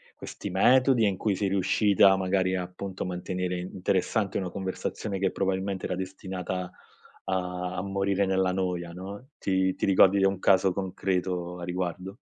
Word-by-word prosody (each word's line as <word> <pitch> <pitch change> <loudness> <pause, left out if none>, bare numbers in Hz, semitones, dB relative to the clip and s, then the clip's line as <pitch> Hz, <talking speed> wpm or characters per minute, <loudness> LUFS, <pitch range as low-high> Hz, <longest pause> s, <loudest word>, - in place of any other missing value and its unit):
questi - - -7
metodi 130 -1 +4
e - - +4
in 95 - -2
cui 100 0 0
sei 100 - 0
riuscita 100 0 +4
magari 95 0 +1
appunto, 90 +1 -5
a - - -5
mantenere 90 0 -3
interessante 95 +3 -1
una 95 -2 -2
conversazione 95 +2 -4
che, 95 -1 +1
probabilmente, 95 0 -2
era 90 - -2
destinata 95 -1 -4
a 90 - -10 1.1
a - - -1
morire 100 0 0
nella 95 -1 +1
noia, 90 -2 -2
no. 100 +7 -8
Ti 95 -1 +1
ti - - -1
ricordi 95 0 +5
di 95 - +2
un 95 -1 +1
caso 95 0 +4
concreto 90 -2 -2
a - - -7
riguardo? 90 +2 -4
95 Hz, 160 wpm, -27 LUFS, 90-100 Hz, 1.1 s, ricordi